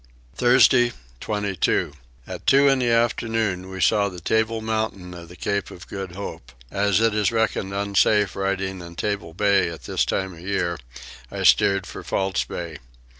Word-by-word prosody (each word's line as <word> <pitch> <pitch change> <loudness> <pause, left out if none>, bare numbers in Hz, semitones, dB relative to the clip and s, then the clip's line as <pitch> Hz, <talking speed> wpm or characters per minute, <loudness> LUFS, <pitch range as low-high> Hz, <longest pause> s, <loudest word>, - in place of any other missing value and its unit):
Thursday 120 0 +4 0.3
22. 100 - -1 0.3
At - - -8
two 140 +1 +6
in 135 -1 +4
the 125 -2 +1
afternoon 115 -5 0
we 95 0 -7
saw 100 0 +3
the 90 -2 -9
Table 110 +5 0
Mountain 110 -5 -3
of 85 -1 -10
the 90 - -12
Cape 100 +5 -2
of 90 - -12
Good 95 -3 -6
Hope. 90 -10 -8 0.2
As 100 -1 +2
it 115 -1 +2
is 105 -1 +1
reckoned 110 -4 0
unsafe 100 0 +2
riding 95 -1 -2
in 85 0 -10
Table 95 -4 -3
Bay 100 -2 +3
at 85 - -9
this - - 0
time 95 -1 -2
of 85 - -13
year 85 -2 -2 0.5
I - - -5
steered 100 -1 +4
for 90 - -9
False 95 -1 -1
Bay. 85 -3 -6
100 Hz, 170 wpm, -23 LUFS, 90-110 Hz, 0.5 s, two